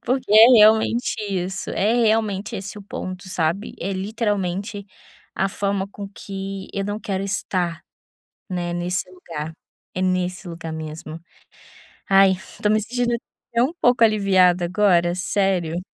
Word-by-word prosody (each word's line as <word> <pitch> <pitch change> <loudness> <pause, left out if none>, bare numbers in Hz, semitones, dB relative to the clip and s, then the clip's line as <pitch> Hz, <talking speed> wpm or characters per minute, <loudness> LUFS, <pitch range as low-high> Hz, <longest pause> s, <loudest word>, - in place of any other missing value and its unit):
porque 255 -1 -1
é 220 +2 +10
realmente 220 +3 +4
isso, 190 0 -3
é 210 +4 +1
realmente 215 -3 +1
esse 200 +2 -6
o - - -10
ponto, 185 -1 -7
sabe, 175 +4 -1
é 195 - -2
literalmente 200 -1 -2 0.5
a 195 - 0
forma 200 0 -2
com 205 -1 -7
que 195 -1 -7
eu 195 -1 -1
não 205 +1 -3
quero 195 -2 -3
estar, 185 -3 -2 0.7
né, 175 -2 -3
nesse 180 +1 -2
lugar, 165 -4 -7 0.4
é 185 - -3
nesse 185 0 -1
lugar 165 -1 -6
mesmo. 160 0 -7 0.9
Ai, 195 -1 +6 0.3
tô 210 - +3
me 215 0 +3
sentindo 240 +2 -1 0.4
até 235 0 +2
um 275 - -1
pouco 245 -1 +4
aliviada 190 -4 +4
agora, 175 -2 +3
sério. 180 -3 0
195 Hz, 140 wpm, -22 LUFS, 180-210 Hz, 0.9 s, é